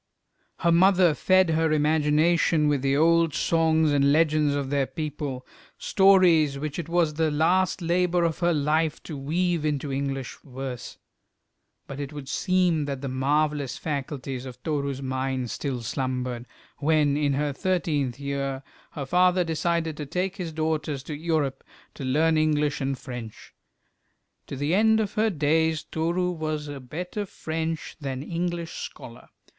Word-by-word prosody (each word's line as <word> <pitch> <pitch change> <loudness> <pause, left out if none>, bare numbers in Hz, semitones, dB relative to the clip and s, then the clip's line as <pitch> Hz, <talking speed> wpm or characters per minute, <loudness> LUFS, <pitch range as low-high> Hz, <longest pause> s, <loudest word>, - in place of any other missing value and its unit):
Her 170 - +3
mother 180 -1 +5
fed 185 +2 +3
her 160 0 +2
imagination 155 +1 +3
with 145 -3 +1
the 135 +1 +1
old 165 -1 +3
songs 160 -2 +2
and 140 -1 +3
legends 155 -2 +3
of 140 -1 -3
their 140 -2 +1
people, 145 -5 -5 0.3
stories 180 -7 +4
which 150 +3 -4
it 165 -1 -5
was 170 -3 +2
the 160 +1 +1
last 175 +5 +1
labour 175 +1 +2
of 165 -2 0
her 175 -1 +2
life 155 0 0
to 155 - -7
weave 165 +4 -1
into 145 -2 -1
English 135 -2 -3
verse; 130 -2 -7 0.9
but 140 - -8
it 140 0 -5
would 145 -2 -8
seem 175 0 +1
that 140 -2 -4
the 140 - -4
marvellous 145 +1 0
faculties 135 -3 -4
of 125 -1 -11
Toru's 140 -3 -2
mind 130 -1 -2
still 130 -5 -3
slumbered, 125 0 -3 0.3
when, 150 -1 +2
in 145 -1 +1
her 145 +1 -1
thirteenth 150 -7 -1
year, 140 -1 -3 0.3
her 140 -3 -4
father 180 +4 +3
decided 165 -1 -1
to 150 - -5
take 185 +5 -2
his 175 -4 -4
daughters 155 -3 -2
to 150 - -6
Europe 155 -3 -1 0.3
to - - -8
learn 155 +5 +2
English 150 -2 +1
and 135 0 -1
French. 125 -5 -9 0.9
To - - -6
the 145 +4 -1
end 220 +3 +4
of 210 -2 -1
her 220 +1 +2
days 160 -1 +1
Toru 170 +3 -1
was 155 -3 -3
a 145 -1 -6
better 180 - -5
French 160 -1 -4
than 135 -2 -4
English 170 +1 -3
scholar. 120 +1 -9
150 Hz, 150 wpm, -25 LUFS, 140-165 Hz, 0.9 s, mother